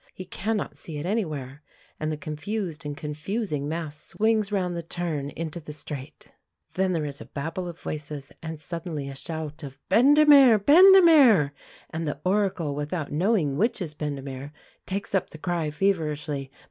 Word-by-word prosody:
He 185 - -7
cannot 210 +3 -3
see 155 -3 -7
it 145 - -4
anywhere, 150 - -3 0.4
and 155 0 -1
the 155 - -3
confused 160 +1 -4
and 145 -1 -5
confusing 155 0 -3
mass 160 -2 -4
swings 215 -1 0
round 180 -3 0
the 170 - -3
turn 165 -4 -3
into 165 +2 -5
the 150 -2 -9
straight. 145 -2 -8 0.4
Then 185 0 +1
there 160 -3 -1
is 140 -1 -6
a - - -8
babel 165 +6 -4
of 170 -1 -8
voices, 150 -2 -6
and 160 -1 -6
suddenly 160 -2 -5
a - - -6
shout 155 +1 -6
of 135 -3 -8
"Bendemeer! 280 -2 +7
Bendemeer!" 295 - +7 0.4
and 160 0 -3
the 145 -1 -3
Oracle, 185 -6 +1
without 150 +2 -3
knowing 160 -4 +1
which 230 +6 +1
is 165 -6 -5
Bendemeer, 140 -2 -5 0.4
takes 200 +1 -4
up 195 - +1
the - - -11
cry 170 -1 -1
feverishly. 150 -5 -1
160 Hz, 160 wpm, -26 LUFS, 150-195 Hz, 0.4 s, Bendemeer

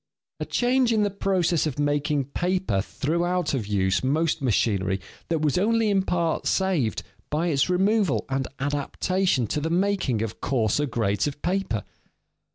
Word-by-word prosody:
A - - -3
change 250 0 +2
in 215 -2 +3
the 205 - 0
process 185 -5 +1
of 145 - -4
making 145 -1 0
paper 175 - -1
threw 155 - -2
out 175 -3 0
of 120 -7 -2
use 100 0 +1
much 155 +4 +1
machinery 100 -6 +1 0.3
that 160 -2 0
was 150 +3 +2
only 225 +1 +2
in 195 -1 +3
part 170 -3 -1
saved 180 - 0 0.3
by 160 +4 0
its 145 +1 +1
removal 195 -1 +2
and 135 -1 -1
adaptation 145 +2 0
to 150 +8 -2
the 160 - -1
making 175 - +1
of 110 -1 -6
coarser 130 +2 +1
grades 105 -4 0
of 145 0 -5
paper. 180 - -1
155 Hz, 160 wpm, -25 LUFS, 130-185 Hz, 0.3 s, in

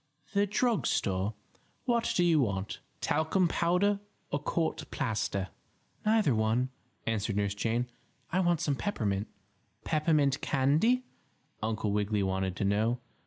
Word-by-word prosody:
"The 200 0 +3
drug 230 +2 +1
store? 95 +3 0 0.5
What 235 -2 +2
do 175 - +4
you 165 -3 +4
want; 100 -6 -1 0.2
talcum 160 +4 +2
powder 180 +5 +2 0.3
or 145 - 0
court 160 +3 -1
plaster?" 110 - -1 0.6
"Neither 215 - +4
one," 110 +4 +1 0.4
answered 110 -2 -1
Nurse 100 -1 +1
Jane. 115 +4 0 0.5
"I 185 - +2
want 175 -3 +2
some 145 - +1
peppermint." 110 - -1 0.6
"Peppermint 150 -3 +2
candy?" 155 - +3 0.6
Uncle 110 -1 -1
Wiggily 105 0 +1
wanted 95 -1 -1
to 100 - -1
know. 110 +5 +2
130 Hz, 125 wpm, -30 LUFS, 105-175 Hz, 0.6 s, do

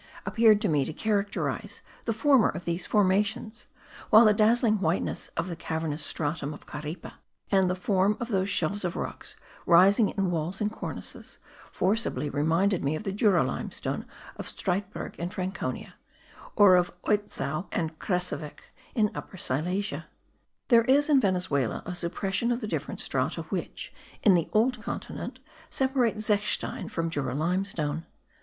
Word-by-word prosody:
appeared 220 -2 +5
to 210 - 0
me 150 -4 +2
to 145 - -4
characterize 205 +1 -2 0.2
the 230 - 0
former 250 +2 +4
of 175 -2 -6
these 170 +1 -2
formations; 210 +3 +1 0.4
while 220 +2 +8
the 215 - +6
dazzling 220 0 +3
whiteness 170 +1 -1
of 165 - -1
the 175 - -4
cavernous 160 -2 -3
stratum 150 -1 -2
of - - -15
Caripe, 150 +4 -7 0.4
and 190 -2 +4
the 180 - 0
form 195 +2 +1
of 235 - -4
those 190 -2 0
shelves 195 +3 0
of 175 -1 -2
rocks - - -5 0.3
rising 195 +5 +6
in 195 -3 -1
walls 170 +3 -2
and 210 0 0
cornices, - - -7 0.3
forcibly 190 -7 0
reminded 165 +6 +1
me 140 +3 0
of 155 - -5
the 195 - -2
Jura 200 -3 +3
limestone - - -4 0.3
of - - -6
Streitberg 195 +1 -3
in 170 +1 -3
Franconia, 185 +1 -4 0.6
or 200 -3 +7
of 180 0 +1
Oitzow 205 -5 -1
and 160 -1 -2
Krzessowic 180 -5 -3 0.2
in 215 -4 +2
Upper 190 - -8
Silesia. 180 +8 -2 0.6
There 230 -2 +6
is 285 +4 +4
in 280 -3 +5
Venezuela 180 - 0
a 180 - -4
suppression 190 +6 -1
of 240 - 0
the 230 - -4
different - - -3
strata - - -1
which, - - -5 0.3
in 205 - +7
the 170 -3 +1
old 240 +2 +2
continent, - - -6 0.3
separate 260 -4 +1
zechstein 210 -1 0
from 165 -1 -2
Jura 145 -4 -1
limestone. 165 -1 -1
190 Hz, 150 wpm, -28 LUFS, 170-215 Hz, 0.6 s, while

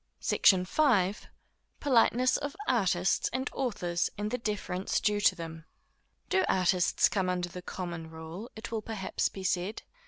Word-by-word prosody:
SECTION 185 -2 +4
V. 205 -6 +3 0.7
Politeness 255 -2 +3
of 285 0 -3
Artists 190 -6 +2
and 260 +2 -2
Authors, 180 -10 -1
and 210 +1 -3
the 250 - -1
Deference 200 -4 -2
due 210 -1 +1
to 185 - +4
them. 165 -2 -8 0.6
Do 380 0 +2
artists 180 -1 +3
come 190 -3 -1
under 180 -1 -1
the 180 +1 -8
common 170 -3 -6
rule, 160 +7 -8
it 220 +1 -8
will 225 -1 -2
perhaps 215 -3 -2
be 190 - -8
said? 185 +3 -1
190 Hz, 150 wpm, -30 LUFS, 180-225 Hz, 0.7 s, SECTION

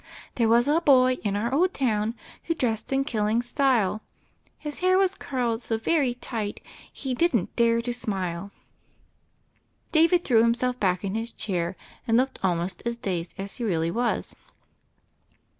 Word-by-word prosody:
'There 230 -2 +1
was 235 +2 +4
a 310 +3 +3
boy 255 -4 +4
in 205 -2 0
our 235 +5 -1
old 360 +6 +2
town 225 -3 0 0.3
Who 330 - 0
dressed 230 -6 -2
in 270 0 +2
killing 225 -3 0
style, 245 -6 +1 0.6
His 295 -1 -5
hair 370 +1 +3
was 385 -1 +3
curled 245 -8 -2
so 225 -1 -2
very 260 +1 +1
tight 220 -4 -4 0.3
He 265 -2 -4
didn't 250 - +1
dare 235 0 +3
to 245 0 -2
smile 195 -5 -3 0.5
!' - - -41
" - - -42
David 335 +2 +4
threw 230 -4 +4
himself 245 +2 +1
back 185 -1 +1
in 195 -1 -2
his 225 +2 -3
chair, 175 -3 -2 0.3
and 225 0 +4
looked 260 +2 0
almost 180 -1 -1
as 235 0 -2
dazed 180 -6 -4
as 200 +1 -5
he 240 - -4
really 165 -6 0
was. 240 +5 -1
235 Hz, 165 wpm, -26 LUFS, 205-265 Hz, 0.6 s, was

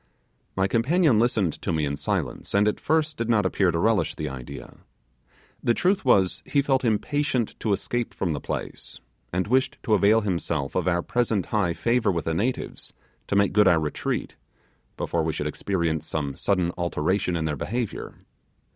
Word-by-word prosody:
My 95 0 +2
companion 130 - +3
listened 110 -8 +2
to - - -2
me 80 -2 0
in 70 0 -2
silence, 70 - -3
and 100 +1 +4
at 105 - 0
first 155 -1 0
did 115 0 -2
not 105 -4 +3
appear 95 0 +2
to 85 - 0
relish 100 -2 +1
the 75 -2 -3
idea. 65 -2 -9 0.8
The 120 - +2
truth 190 +2 +1
was, 95 -8 +3
he 140 -1 +1
felt 135 -2 +1
impatient 125 +2 0
to 110 - -1
escape 120 +4 -1
from 85 -4 -1
the 70 - -4
place, - - -6 0.3
and 90 +1 0
wished 130 +4 +1
to 110 - +1
avail 105 +2 +5
himself 85 -8 -2
of 90 - -1
our 85 -1 +1
present 115 -6 0
high 100 -6 +2
favour 115 +1 +1
with 85 -2 -2
the 80 - 0
natives 115 +10 -2 0.3
to - - -1
make 100 0 +3
good 105 -1 +5
our 85 -3 +5
retreat, 75 -2 -3 0.6
before 85 - -1
we 80 0 -1
should 75 - -3
experience 80 0 -1
some 70 -3 -2
sudden 90 +1 +1
alteration 85 +2 0
in 80 - -2
their 75 -2 -1
behaviour. 115 - -4
100 Hz, 180 wpm, -25 LUFS, 85-115 Hz, 0.8 s, avail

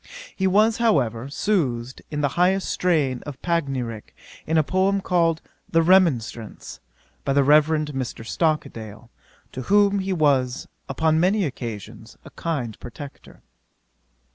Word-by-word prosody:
He 190 - +1
was, 215 +4 +3
however, 135 - +1
soothed 130 - -1
in 150 -1 -3
the 145 - +2
highest 180 +5 +1
strain 150 -8 +1
of 145 -2 -8
panegyrick, 135 -10 -2 0.3
in 160 +1 +1
a 155 - +4
poem 190 +4 +1
called 170 -4 +1 0.3
The 165 0 +3
Remonstrance, 150 - +1 0.4
by 135 - 0
the 140 0 +4
Rev. 150 +2 +5
Mr. 150 -7 -3
Stockdale, 115 - -2 0.4
to 130 - -6
whom 200 +6 +3
he 190 0 -2
was, 140 -6 +1 0.2
upon 160 0 +1
many 190 +3 +2
occasions, 115 - -7
a - - -12
kind 130 -10 -4
protector. 140 +3 -11
155 Hz, 130 wpm, -23 LUFS, 130-180 Hz, 0.4 s, Rev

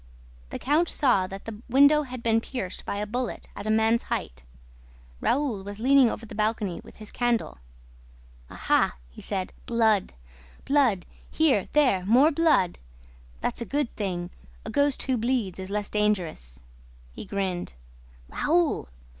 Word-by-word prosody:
The - - -5
count 310 +5 +1
saw 245 -10 +2
that 195 +1 -9
the 220 -1 -8
window 285 +4 +6
had 255 -4 -7
been 225 0 +3
pierced 225 -8 -6
by - - -3
a 210 - -2
bullet 240 +3 -4
at 200 - -6
a - - 0
man's 220 +1 +3
height. - - -4 0.8
Raoul 250 -8 0
was 205 +1 -7
leaning 260 +2 +5
over 225 - -5
the 225 - -11
balcony 210 -4 -1
with - - -15
his 215 -1 -10
candle: 240 - -1 0.9
"Aha!" - - +1 0.2
he - - -12
said. 190 -2 -4
"Blood!... 220 - +2 0.5
Blood!... 255 -11 +2 0.2
Here, 280 -11 +2
there, 255 -11 +3
more 260 +8 +6
blood!... 300 - +2 0.6
That's - - -2
a - - 0
good 285 0 -2
thing! 180 -4 -3 0.3
A - - -5
ghost 285 -1 +1
who 260 -2 0
bleeds 230 -6 -1
is 190 0 -6
less 205 0 -2
dangerous!" 175 - -2 0.5
he - - -8
grinned. 185 - -3 0.5
"Raoul! 320 - +1
220 Hz, 150 wpm, -26 LUFS, 195-265 Hz, 0.9 s, window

